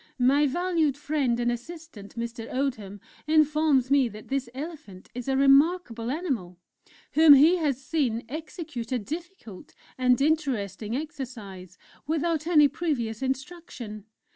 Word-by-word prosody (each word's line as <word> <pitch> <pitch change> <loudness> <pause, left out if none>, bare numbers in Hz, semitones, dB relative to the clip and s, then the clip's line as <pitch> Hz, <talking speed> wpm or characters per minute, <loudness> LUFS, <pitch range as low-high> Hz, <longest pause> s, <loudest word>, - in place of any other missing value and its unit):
My 275 +4 +4
valued 325 -2 0
friend 285 -5 0
and 240 0 +1
assistant, 245 -4 -9
Mr. 230 0 -5
Oldham, 230 -7 -3 0.3
informs 305 -4 +3
me 275 -4 +4
that 215 0 -12
this 270 -2 -2
Elephant 275 - -9
is 250 0 -6
a 265 -1 +1
remarkable 275 -4 +3
animal, 255 - -3 0.5
whom 305 0 +8
he 315 +6 +6
has 290 -6 0
seen 255 -4 -1
execute 305 -3 -7
a 255 - +1
difficult 305 - -8 0.2
and 250 -1 +3
interesting 255 - -1
exercise 220 - -7 0.3
without 320 0 -1
any 300 -4 +6
previous 250 -9 -3
instruction. 265 - -5
270 Hz, 125 wpm, -26 LUFS, 235-310 Hz, 0.5 s, whom